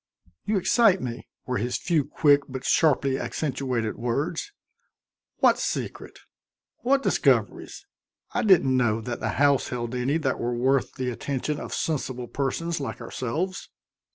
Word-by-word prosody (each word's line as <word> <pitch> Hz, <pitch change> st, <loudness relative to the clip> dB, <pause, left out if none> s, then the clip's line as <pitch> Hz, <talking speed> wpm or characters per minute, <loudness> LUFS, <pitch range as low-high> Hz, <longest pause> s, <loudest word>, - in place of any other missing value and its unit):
"You 210 Hz, 0 st, +1 dB
excite 195 Hz, 0 st, +4 dB
me," 120 Hz, -4 st, -6 dB, 0.2 s
were 125 Hz, -4 st, -1 dB
his 120 Hz, +3 st, -1 dB
few 165 Hz, -4 st, +1 dB
quick 145 Hz, 0 st, +3 dB
but 130 Hz, -1 st, -6 dB
sharply 140 Hz, -4 st, +3 dB
accentuated 130 Hz, -6 st, -2 dB
words. 140 Hz, -, -2 dB, 0.9 s
"What -, -, +4 dB
secret? -, -, -4 dB, 0.6 s
What 270 Hz, +2 st, +1 dB
discoveries? -, -, +1 dB, 0.5 s
I -, -, 0 dB
didn't 175 Hz, -, +4 dB
know 115 Hz, -3 st, +2 dB
that 120 Hz, +1 st, -5 dB
the -, -, -2 dB
house 140 Hz, -1 st, +3 dB
held 120 Hz, -1 st, -4 dB
any 125 Hz, +5 st, 0 dB
that 135 Hz, -5 st, -1 dB
were 120 Hz, +1 st, -1 dB
worth 130 Hz, +2 st, +1 dB
the 125 Hz, -1 st, -2 dB
attention 140 Hz, +4 st, -3 dB
of -, -, -7 dB
sensible 130 Hz, -5 st, -2 dB
persons 155 Hz, +6 st, -2 dB
like 140 Hz, -, -5 dB
ourselves." 165 Hz, +10 st, -4 dB
135 Hz, 140 wpm, -25 LUFS, 125-160 Hz, 0.9 s, excite